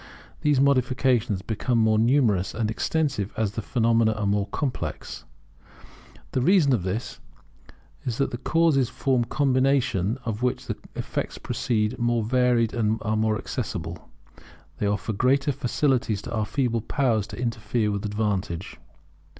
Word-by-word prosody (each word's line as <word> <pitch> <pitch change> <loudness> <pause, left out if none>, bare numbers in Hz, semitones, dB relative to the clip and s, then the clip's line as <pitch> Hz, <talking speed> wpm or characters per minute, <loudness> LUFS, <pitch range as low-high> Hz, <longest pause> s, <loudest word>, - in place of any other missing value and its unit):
These 145 -3 +3
modifications 125 -6 +2
become 115 +3 -1
more 110 -1 +3
numerous 115 -6 +2
and 110 -1 -1
extensive 140 -5 -1
as 110 -3 0
the 110 - -4
phenomena 115 -2 +2
are 105 -1 -3
more 100 0 +1
complex. 125 - -4 1.1
The 130 - 0
reason 160 -2 +4
of 115 - +1
this 95 +6 -4 0.8
is 120 -2 -3
that 140 - 0
the 120 - -5
causes 155 -4 +2
from 130 -3 +1
a - - 0
combination 130 -6 +1
of 110 -1 -3
which 125 0 -1
the - - -3 0.2
effects - - -3
proceed 110 -5 -1
being 120 - 0
more 120 -1 +1
varied 120 -1 +2
and 110 -1 0
more 110 0 0
accessible, 85 - -5 0.7
offer 105 +1 0
greater 135 +6 +2
facilities 125 -4 0
to - - -6
our 110 -2 -1
feeble 120 -5 0
powers 115 -5 0
to 120 - -9
interfere 115 -2 -1
with 100 -1 -3
advantage. 100 -4 -2
115 Hz, 140 wpm, -25 LUFS, 105-130 Hz, 1.1 s, reason